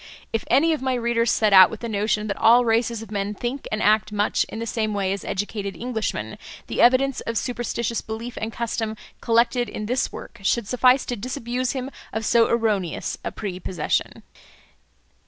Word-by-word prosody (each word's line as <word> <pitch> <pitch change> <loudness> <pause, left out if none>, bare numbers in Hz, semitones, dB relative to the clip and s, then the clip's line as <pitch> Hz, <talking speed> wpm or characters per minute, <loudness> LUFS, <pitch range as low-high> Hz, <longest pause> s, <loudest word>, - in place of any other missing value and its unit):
If 225 - -1
any 320 +6 +4
of 305 - -3
my 260 -1 0
readers 235 -1 +1
set 215 -3 +2
out 190 -1 +9
with - - -8
the 235 - -3
notion 210 0 0
that 200 -2 -3
all 240 +2 +5
races 230 0 +1
of 225 - -13
men 205 0 -2
think 245 +6 -4
and 215 0 -1
act 215 0 +3
much 205 0 +1
in - - -8
the 230 - -3
same 215 -2 -1
way 195 -1 0
as 200 - -5
educated 200 0 -3
Englishmen, 235 -2 -3 0.3
the - - -1
evidence 260 +2 +4
of 230 -1 -3
superstitious 235 0 -2
belief 225 +2 -6
and 220 +1 -3
custom 225 -1 -3 0.2
collected 235 +1 +2
in 215 - -5
this 250 +4 0
work - - -10
should 205 +2 0
suffice 250 +2 +4
to 245 - -3
disabuse 250 +2 -3
him 265 0 -4 0.2
of 220 0 -2
so 230 +1 +4
erroneous 210 -7 -1
a - - -3
prepossession. 185 -3 -3
230 Hz, 185 wpm, -23 LUFS, 210-245 Hz, 0.3 s, out